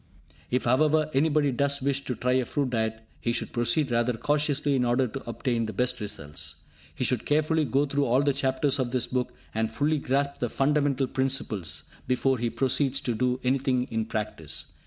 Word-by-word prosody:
If 125 Hz, +1 st, +1 dB
however, 155 Hz, +5 st, +3 dB
anybody 145 Hz, 0 st, +3 dB
does 140 Hz, +2 st, +1 dB
wish 140 Hz, 0 st, 0 dB
to 125 Hz, -, -2 dB
try 125 Hz, +3 st, 0 dB
a 130 Hz, -1 st, +2 dB
fruit 140 Hz, -2 st, -1 dB
diet, 110 Hz, -1 st, -1 dB, 0.2 s
he 120 Hz, -, 0 dB
should -, -, -3 dB
proceed 120 Hz, +3 st, +1 dB
rather 120 Hz, +1 st, +2 dB
cautiously 145 Hz, +3 st, +1 dB
in 130 Hz, -, +2 dB
order 120 Hz, +2 st, +2 dB
to 125 Hz, +1 st, -6 dB
obtain 115 Hz, -1 st, -1 dB
the 110 Hz, -, -5 dB
best 125 Hz, 0 st, 0 dB
results. 80 Hz, -7 st, -5 dB, 0.4 s
He -, -, -2 dB
should 125 Hz, -2 st, +1 dB
carefully 155 Hz, +1 st, +2 dB
go 140 Hz, +2 st, +2 dB
through 140 Hz, 0 st, 0 dB
all 130 Hz, +3 st, +3 dB
the 140 Hz, -1 st, +2 dB
chapters 135 Hz, +1 st, 0 dB
of 130 Hz, -2 st, 0 dB
this 125 Hz, 0 st, 0 dB
book, 125 Hz, -1 st, -2 dB, 0.2 s
and 110 Hz, 0 st, 0 dB
fully 145 Hz, +6 st, +1 dB
grasp 140 Hz, +1 st, 0 dB
the 120 Hz, -, -1 dB
fundamental 140 Hz, 0 st, +1 dB
principles, 130 Hz, -, -1 dB, 0.2 s
before 130 Hz, 0 st, +1 dB
he 120 Hz, 0 st, 0 dB
proceeds 135 Hz, +2 st, +1 dB
to 120 Hz, -, -1 dB
do 125 Hz, +2 st, 0 dB
anything 130 Hz, -1 st, +1 dB
in 110 Hz, -1 st, 0 dB
practice. 80 Hz, -9 st, -4 dB
130 Hz, 190 wpm, -27 LUFS, 120-140 Hz, 0.4 s, however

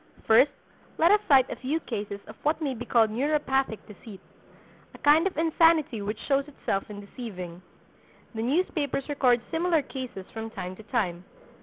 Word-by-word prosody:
First, 240 Hz, +6 st, +6 dB, 0.5 s
let 335 Hz, +3 st, +5 dB
us 420 Hz, -, +6 dB
cite 265 Hz, -4 st, +6 dB
a -, -, -3 dB
few 285 Hz, +5 st, -1 dB
cases 205 Hz, -5 st, -5 dB
of -, -, -11 dB
what 305 Hz, +2 st, +1 dB
may 290 Hz, -4 st, -1 dB
be 245 Hz, 0 st, -7 dB
called 225 Hz, -3 st, +3 dB
neuropathic 270 Hz, -1 st, 0 dB
deceit—a 210 Hz, -1 st, -16 dB
kind 310 Hz, +5 st, +4 dB
of 380 Hz, -, -6 dB
insanity 320 Hz, -6 st, +3 dB
which 210 Hz, +2 st, -3 dB
shows 275 Hz, 0 st, +1 dB
itself 205 Hz, -9 st, -3 dB
in 205 Hz, -1 st, -8 dB
deceiving. 185 Hz, -6 st, -8 dB, 0.7 s
The 220 Hz, -, -4 dB
newspapers 285 Hz, 0 st, -1 dB
record 255 Hz, -5 st, +2 dB
similar 330 Hz, -2 st, +1 dB
cases 255 Hz, -9 st, -7 dB
from 225 Hz, 0 st, -5 dB
time 185 Hz, -4 st, -6 dB
to 220 Hz, -, -12 dB
time. 180 Hz, -8 st, -1 dB
255 Hz, 160 wpm, -27 LUFS, 215-300 Hz, 0.7 s, First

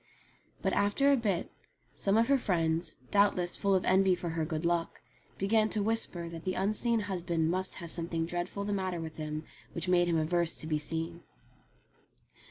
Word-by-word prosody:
But, -, -, +1 dB
after 240 Hz, +8 st, +3 dB
a -, -, +6 dB
bit, 205 Hz, -8 st, -1 dB, 0.4 s
some 200 Hz, +2 st, +1 dB
of 230 Hz, +1 st, +4 dB
her 275 Hz, -1 st, +4 dB
friends, 165 Hz, -5 st, 0 dB
doubtless 200 Hz, -3 st, +3 dB
full 200 Hz, -1 st, +2 dB
of 185 Hz, -, +1 dB
envy 190 Hz, 0 st, +4 dB
for 175 Hz, -1 st, -4 dB
her 160 Hz, -1 st, -1 dB
good 155 Hz, +1 st, -3 dB
luck, 170 Hz, -1 st, 0 dB, 0.4 s
began 215 Hz, +2 st, +2 dB
to 215 Hz, -2 st, +1 dB
whisper 205 Hz, -6 st, 0 dB
that 165 Hz, -1 st, -8 dB
the 185 Hz, -, -2 dB
unseen 215 Hz, +4 st, +1 dB
husband 175 Hz, -5 st, -1 dB
must 185 Hz, +1 st, 0 dB
have 170 Hz, -3 st, -4 dB
something 165 Hz, -1 st, -1 dB
dreadful 175 Hz, +4 st, -3 dB
the 205 Hz, 0 st, -2 dB
matter 185 Hz, -3 st, -2 dB
with 160 Hz, -1 st, -7 dB
him 155 Hz, 0 st, -4 dB, 0.3 s
which 170 Hz, +1 st, -2 dB
made 175 Hz, -1 st, +4 dB
him 170 Hz, -1 st, +2 dB
averse 170 Hz, +1 st, +1 dB
to -, -, -6 dB
being 155 Hz, -1 st, 0 dB
seen. 165 Hz, +2 st, -4 dB
175 Hz, 180 wpm, -31 LUFS, 165-200 Hz, 0.4 s, a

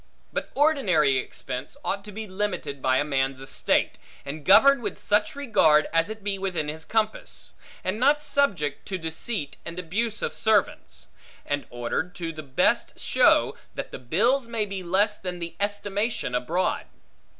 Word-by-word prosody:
But -, -, -2 dB
ordinary 185 Hz, -, +3 dB
expense, 125 Hz, -, -6 dB
ought 200 Hz, 0 st, -1 dB
to 210 Hz, -, -8 dB
be 220 Hz, +2 st, -6 dB
limited 185 Hz, -8 st, -3 dB
by 130 Hz, 0 st, +3 dB
a -, -, +2 dB
man's 135 Hz, -2 st, -1 dB
estate; 135 Hz, -, 0 dB, 0.3 s
and 145 Hz, +2 st, -6 dB
governed 240 Hz, -, +7 dB
with -, -, -4 dB
such 210 Hz, +3 st, +1 dB
regard, 185 Hz, -, +4 dB
as 165 Hz, +4 st, +2 dB
it 220 Hz, -1 st, -7 dB
be 200 Hz, -1 st, 0 dB
within 180 Hz, -6 st, -2 dB
his 160 Hz, +1 st, -5 dB
compass; 220 Hz, +1 st, -2 dB, 0.3 s
and 185 Hz, +4 st, -2 dB
not 285 Hz, +4 st, +4 dB
subject 200 Hz, -, 0 dB
to 190 Hz, -, -2 dB
deceit 160 Hz, 0 st, -4 dB
and 170 Hz, +1 st, -7 dB
abuse 205 Hz, +6 st, -2 dB
of -, -, -1 dB
servants; 215 Hz, -3 st, 0 dB, 0.4 s
and 145 Hz, 0 st, -2 dB
ordered 120 Hz, +10 st, -3 dB
to 170 Hz, -3 st, -4 dB
the 155 Hz, -, -7 dB
best 135 Hz, -3 st, +1 dB
show, -, -, +3 dB, 0.2 s
that -, -, -5 dB
the -, -, -7 dB
bills 230 Hz, -, +1 dB
may 230 Hz, -2 st, -1 dB
be 195 Hz, -2 st, -5 dB
less 195 Hz, +4 st, +1 dB
than 180 Hz, -1 st, -5 dB
the 170 Hz, -1 st, -6 dB
estimation 205 Hz, -, -1 dB
abroad. 160 Hz, +10 st, -1 dB
185 Hz, 160 wpm, -26 LUFS, 150-215 Hz, 0.4 s, governed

